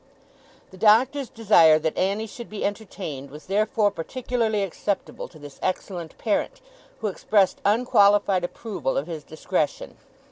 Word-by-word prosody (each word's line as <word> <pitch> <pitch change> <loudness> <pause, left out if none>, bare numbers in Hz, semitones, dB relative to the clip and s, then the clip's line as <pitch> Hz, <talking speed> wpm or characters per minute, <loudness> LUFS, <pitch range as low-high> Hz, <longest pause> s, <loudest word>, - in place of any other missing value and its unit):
The 190 - -13
Doctor's 250 +6 +4
desire 175 -9 +5
that 155 0 -2
Annie 200 +4 0
should 235 +2 -9
be 215 - -4
entertained, 185 -9 -5
was 150 +3 -12
therefore 210 +1 +1
particularly 220 +2 -1
acceptable 195 +1 -3
to 160 - -16
this 145 -2 -12
excellent 180 -3 -4
parent; 235 - -1 0.4
who 220 - 0
expressed 200 0 +1
unqualified 205 -3 +4
approval 175 - -3
of 140 - -1
his 160 -3 -6
discretion. 155 -1 -3
200 Hz, 135 wpm, -24 LUFS, 165-220 Hz, 0.4 s, desire